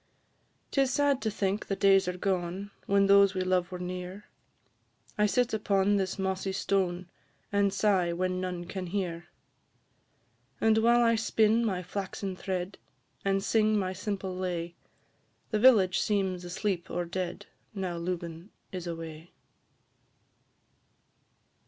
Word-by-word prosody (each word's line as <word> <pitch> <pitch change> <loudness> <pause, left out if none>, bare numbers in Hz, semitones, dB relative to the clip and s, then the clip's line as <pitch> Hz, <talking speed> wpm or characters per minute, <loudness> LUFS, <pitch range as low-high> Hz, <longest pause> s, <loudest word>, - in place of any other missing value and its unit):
'Tis 270 -2 +2
sad 285 -1 +2
to 220 - 0
think 200 0 -2
the 195 - -1
days 195 -1 +4
are 180 0 -2
gone, 190 +1 -2 0.2
When 200 0 +4
those 200 0 +6
we 185 - 0
love 185 0 +1
were 180 - -4
near; 180 +2 -6 0.9
I 210 -1 +3
sit 245 +3 +1
upon 205 -1 +2
this 190 -1 -1
mossy 190 0 -2
stone, 185 -2 0 0.4
And 200 -1 +2
sigh 190 -3 +2
when 185 +1 -1
none 180 -1 -4
can 185 0 -5
hear. 175 -3 -3 1.3
And 220 0 +4
while 235 +1 +4
I 230 0 +4
spin 225 0 +2
my 190 -5 -1
flaxen 195 +1 -4
thread, 185 0 -4 0.4
And 195 0 +1
sing 215 0 +3
my 185 -2 -1
simple 190 -1 -4
lay, 175 -2 -3 0.8
The 215 - +1
village 210 -7 +5
seems 190 -4 0
asleep 180 0 -2
or 175 - -2
dead, 180 +2 -4 0.3
Now 185 -3 -3
Lubin 170 +1 -5 0.2
is 180 -2 -5
away. 165 0 -7
190 Hz, 135 wpm, -29 LUFS, 180-205 Hz, 1.3 s, those